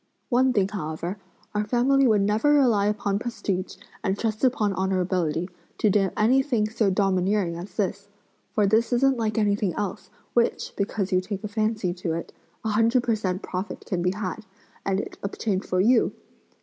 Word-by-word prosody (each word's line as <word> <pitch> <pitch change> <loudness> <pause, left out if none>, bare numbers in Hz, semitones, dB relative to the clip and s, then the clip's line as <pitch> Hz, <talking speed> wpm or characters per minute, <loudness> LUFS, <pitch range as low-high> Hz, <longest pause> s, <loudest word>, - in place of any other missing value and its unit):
One 255 +1 +4
thing 200 -5 +2
however; 175 0 -4 0.3
our 210 0 +1
family 255 +5 +3
would 215 -3 +4
never 215 +9 +3
rely 230 -8 +4
upon 205 -1 0
prestige, 200 -5 -3 0.3
and 195 -1 0
trust 220 +1 -2
upon 220 -6 +2
honorability 180 -3 0 0.3
to 210 - +3
do 195 -1 +3
anything 245 -1 +3
so 220 -2 +1
domineering 190 -1 +1
as 175 +4 -8
this! 200 -1 -1 0.5
for 210 - +4
this 220 +5 +2
isn't 265 +1 +3
like 220 -1 -1
anything 205 -4 +1
else, 205 -3 -4 0.2
which, 235 -1 +1
because 200 -1 -2
you 185 0 +3
take 195 +1 -5
a - - -2
fancy 215 -3 -1
to 175 -2 -3
it, 165 - -5 0.3
a - - +1
hundred 230 +3 +3
per 235 - +1
cent 190 -3 -2
profit 185 +3 -5
can 180 -3 -2
be 180 +1 +2
added, 210 +2 -5 0.4
and 195 0 0
it - - -6
obtained 200 -1 -2
for 185 - 0
you! 230 +5 +4
205 Hz, 175 wpm, -25 LUFS, 190-225 Hz, 0.5 s, One